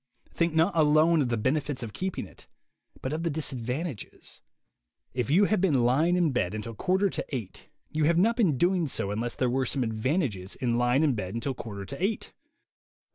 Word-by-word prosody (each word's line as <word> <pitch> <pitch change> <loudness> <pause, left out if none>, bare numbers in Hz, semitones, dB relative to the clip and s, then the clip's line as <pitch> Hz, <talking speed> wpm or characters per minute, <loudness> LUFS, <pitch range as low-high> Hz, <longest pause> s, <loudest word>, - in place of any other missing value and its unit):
Think 170 -1 0
not 165 +4 +3
alone 155 +1 +4
of 130 - 0
the 120 - 0
benefits 135 +3 -1
of 110 - -6
keeping 190 0 -3
it, - - -15 0.6
but 130 - -2
of 160 - -2
the 170 - 0
disad 145 -5 -2
vantages. 130 - -5 0.7
If 125 -3 -2
you 185 +8 +5
have 210 -2 +1
been 145 -10 +3
lying 150 +9 +3
in 175 -4 +2
bed 105 -6 -1
until 110 +2 -5
quarter 190 - +1
to - - -3
eight, 120 -9 -6 0.2
you 155 -1 +1
have 165 +2 +3
not 225 +6 +3
been 190 - +2
doing 175 +1 +2
so 100 -6 -2
unless 115 +3 -2
there 130 - +1
were 130 +1 0
some 135 0 0
advantages 110 - -1
in 120 -2 0
lying 125 +4 +3
in 145 -4 +3
bed 100 -2 -4
until 120 +4 -2
quarter 100 -5 -7
to 140 - -6
eight. 210 +3 -2
140 Hz, 200 wpm, -28 LUFS, 120-170 Hz, 0.7 s, you